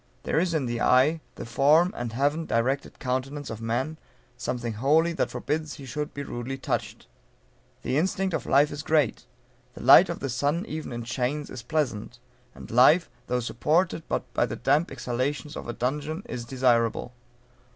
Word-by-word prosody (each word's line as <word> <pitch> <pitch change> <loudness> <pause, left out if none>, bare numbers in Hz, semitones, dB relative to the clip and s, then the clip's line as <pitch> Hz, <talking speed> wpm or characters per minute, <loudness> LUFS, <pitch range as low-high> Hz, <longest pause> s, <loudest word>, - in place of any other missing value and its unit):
There - - +1
is 170 -1 0
in 145 -4 0
the 120 -1 -3
eye, 150 +6 +4
the - - -7
form, 150 +9 +4
and 120 -1 -4
heaven 145 +7 0
directed 130 +4 -1
countenance 130 +2 -3
of 110 0 -7
man, 130 +8 -2 0.4
something 120 -2 -3
holy, 155 +9 +2
that - - 0
forbids 155 0 -3
he 140 - -10
should 150 +4 -4
be 140 - -6
rudely 130 0 -5
touched. 135 - -3 0.8
The 130 - 0
instinct 190 +2 0
of 155 -6 -2
life 145 +2 +4
is 145 0 -5
great. 150 -7 +1 0.5
The - - -9
light - - +8
of - - -4
the 135 - -3
sun 145 - 0
even 155 -3 -5
in 120 0 -4
chains, 125 +5 -2
is 130 - -7
pleasant; 120 -4 -2 0.4
and - - -11
life, 140 +9 +5 0.2
though 125 0 0
supported 160 +9 +1
but - - -1
by - - +2
the - - -4
damp 145 +5 +2
exhalations 135 +4 -3
of - - -7
a 120 - -3
dungeon, 150 +9 -2
is 120 -1 -6
desirable. 120 -2 +1
135 Hz, 175 wpm, -26 LUFS, 120-155 Hz, 0.8 s, light